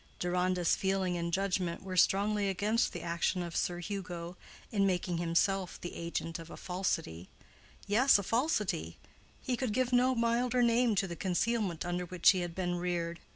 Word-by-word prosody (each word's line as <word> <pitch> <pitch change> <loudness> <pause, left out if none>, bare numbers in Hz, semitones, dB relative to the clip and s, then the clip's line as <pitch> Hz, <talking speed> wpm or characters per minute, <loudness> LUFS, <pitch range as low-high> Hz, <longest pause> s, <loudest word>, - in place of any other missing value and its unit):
Deronda's 180 0 +1
feeling 190 -2 0
and 170 0 -2
judgment 185 -2 -1
were 190 -1 -5
strongly 200 +2 +3
against 210 +5 +1
the - - -6
action 170 +1 0
of 170 -1 -6
Sir 175 - 0
Hugo 175 -1 -5 0.4
in 200 -3 +2
making 180 -2 -1
himself 175 +2 0
the 175 - -6
agent 165 0 -4
of 165 0 -10
a - - -9
falsity—yes, 185 - -1
a 200 - -3
falsity: 210 - -1 0.5
he 255 - 0
could 245 -3 -2
give 255 +1 0
no 255 +1 +4
milder 240 +1 +2
name 235 -1 +3
to 195 - +1
the 170 -2 -5
concealment 190 -1 -1
under 175 0 -2
which 180 -1 +5
he 185 - -1
had 175 -1 -4
been 180 -1 -1
reared. 170 -1 -2
185 Hz, 165 wpm, -32 LUFS, 175-210 Hz, 0.5 s, which